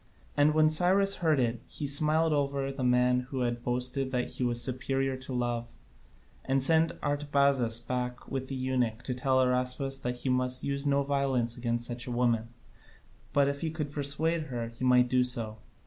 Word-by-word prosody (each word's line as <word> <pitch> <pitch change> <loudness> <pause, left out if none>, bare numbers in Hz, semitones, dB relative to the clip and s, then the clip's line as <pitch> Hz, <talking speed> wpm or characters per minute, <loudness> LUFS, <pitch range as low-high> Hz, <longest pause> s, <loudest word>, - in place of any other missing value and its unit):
And 150 +1 +3
when 155 0 +5
Cyrus 190 +4 +3
heard 160 -5 +2
it 120 -2 -1
he 150 - -5
smiled 155 +3 +3
over 140 -1 -1
the 135 -1 -5
man 125 0 +2
who 135 -2 -3
had 120 -1 -2
boasted 125 +2 -1
that 125 -1 -2
he - - -3
was 120 -1 +1
superior 135 +2 0
to 130 +1 -10
love, 120 -2 -3 0.7
and 135 0 0
sent 160 +2 +3
Artabazus 140 -5 +2
back 125 0 -4
with 130 -1 -4
the 135 - -5
eunuch 125 -3 -1
to 130 - -3
tell 130 +1 0
Araspas 130 +1 +1
that 125 0 -4
he - - -4
must 125 0 0
use 140 +1 -2
no 140 0 +2
violence 135 -4 0
against 120 -1 -2
such 120 0 -4
a - - -4
woman, 120 -2 +1 0.8
but 140 -1 +3
if 140 0 -3
he 165 - -1
could 155 -2 -4
persuade 155 +3 0
her, 120 -5 -4
he 115 +2 -10
might 125 -1 +4
do 125 0 +2
so. 115 -3 -2
130 Hz, 185 wpm, -29 LUFS, 125-140 Hz, 0.8 s, when